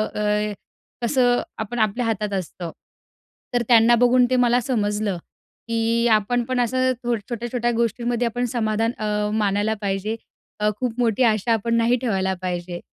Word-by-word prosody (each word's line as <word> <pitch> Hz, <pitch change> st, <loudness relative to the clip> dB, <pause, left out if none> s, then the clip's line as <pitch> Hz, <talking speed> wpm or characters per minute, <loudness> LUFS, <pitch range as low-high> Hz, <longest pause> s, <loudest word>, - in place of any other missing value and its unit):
अ, 210 Hz, 0 st, 0 dB, 0.5 s
कसं 245 Hz, -1 st, +3 dB, 0.2 s
आपण 220 Hz, +2 st, -4 dB
आपल्या 220 Hz, +3 st, +1 dB
हातात 210 Hz, -2 st, -1 dB
असतं. 175 Hz, -1 st, -7 dB, 0.8 s
तर 245 Hz, -, +2 dB
त्यांना 235 Hz, 0 st, +6 dB
बघून 250 Hz, 0 st, +5 dB
ते 255 Hz, -, +2 dB
मला 245 Hz, -1 st, +3 dB
समजलं 210 Hz, -5 st, -1 dB, 0.5 s
की 230 Hz, +1 st, +1 dB
आपण 220 Hz, +3 st, +2 dB
पण 255 Hz, +1 st, -1 dB
असं 255 Hz, +2 st, +2 dB, 0.4 s
छोट्या-छोट्या 240 Hz, 0 st, -1 dB
गोष्टींमध्ये 235 Hz, +1 st, 0 dB
आपण 245 Hz, +2 st, -1 dB
समाधान 225 Hz, -1 st, 0 dB
अ, 210 Hz, -1 st, -1 dB
मानायला 210 Hz, 0 st, +1 dB
पाहिजे. 200 Hz, +2 st, -2 dB, 0.4 s
अ, 210 Hz, 0 st, +2 dB
खूप 250 Hz, -3 st, -1 dB
मोठी 235 Hz, 0 st, +2 dB
आशा 225 Hz, 0 st, +2 dB
आपण 230 Hz, +1 st, 0 dB
नाही 230 Hz, +1 st, +3 dB
ठेवायला 190 Hz, -6 st, 0 dB
पाहिजे. 175 Hz, -1 st, -4 dB
225 Hz, 145 wpm, -22 LUFS, 210-240 Hz, 0.8 s, त्यांना